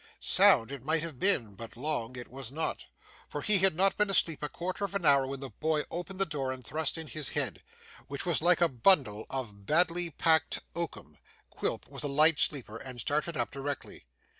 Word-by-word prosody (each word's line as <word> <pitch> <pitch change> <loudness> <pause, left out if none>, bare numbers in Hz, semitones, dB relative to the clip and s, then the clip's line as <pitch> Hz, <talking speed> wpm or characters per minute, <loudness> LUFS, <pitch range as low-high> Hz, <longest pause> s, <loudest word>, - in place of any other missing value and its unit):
Sound 115 +3 +5
it 140 -3 -7
might 160 +2 0
have 160 -7 -7
been, 140 - +2
but 115 +3 -10
long 130 -3 -2
it 125 -1 -8
was 130 -1 -8
not, 160 +3 -3 0.4
for 145 - -5
he 210 -2 +3
had 190 -3 +4
not 195 +2 +2
been 210 0 +2
asleep 165 -5 +2
a 150 - -3
quarter 185 +3 -4
of 200 0 -3
an 195 -4 -2
hour 140 -2 +5
when 135 0 -6
the 135 - -7
boy 155 -1 -1
opened 180 +3 -6
the 195 - +2
door 140 -5 -3
and 130 -2 -8
thrust 155 +3 -2
in 160 - -5
his 155 -3 -3
head, - - -2 0.5
which 140 0 -5
was 170 -4 +1
like 175 +1 +3
a 170 - +6
bundle 125 - +3
of 105 -7 -6
badly 175 +2 +2
picked 160 +1 +2
oakum. 170 -1 -6 0.3
Quilp - - -3
was - - -7
a 145 - -1
light 150 +2 +4
sleeper 120 -7 0
and 125 +1 -8
started 150 +6 -2
up 120 - -1
directly. 140 - -6
150 Hz, 210 wpm, -30 LUFS, 130-170 Hz, 0.5 s, a